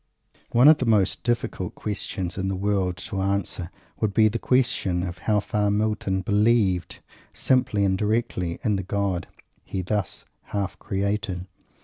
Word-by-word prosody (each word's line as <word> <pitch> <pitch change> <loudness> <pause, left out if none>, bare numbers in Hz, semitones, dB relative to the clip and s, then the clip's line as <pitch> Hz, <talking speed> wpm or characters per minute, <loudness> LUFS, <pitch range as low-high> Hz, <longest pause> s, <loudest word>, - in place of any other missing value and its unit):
One 125 +4 +5
of 155 0 +8
the 125 - -1
most 105 -4 +3
difficult 120 -6 -2
questions 95 -3 -3
in 95 0 -2
the 95 - -1
world 95 -2 0
to 100 -4 -4
answer 95 -3 -1 0.3
would 105 -2 0
be 110 -1 +6
the 115 +2 -3
question 120 -9 +1
how 95 +4 0
far 105 0 0
Milton 105 -2 0
"believed" 105 -3 +2 0.3
simply 125 -6 +2
and 95 -1 +2
directly, 105 -5 -1
in 105 -2 +2
the - - -1
God 95 -2 -1 0.4
he 95 - -4
thus 100 -1 -2 0.2
half 100 -2 -3
created. 95 -2 -2
100 Hz, 145 wpm, -25 LUFS, 95-110 Hz, 0.4 s, of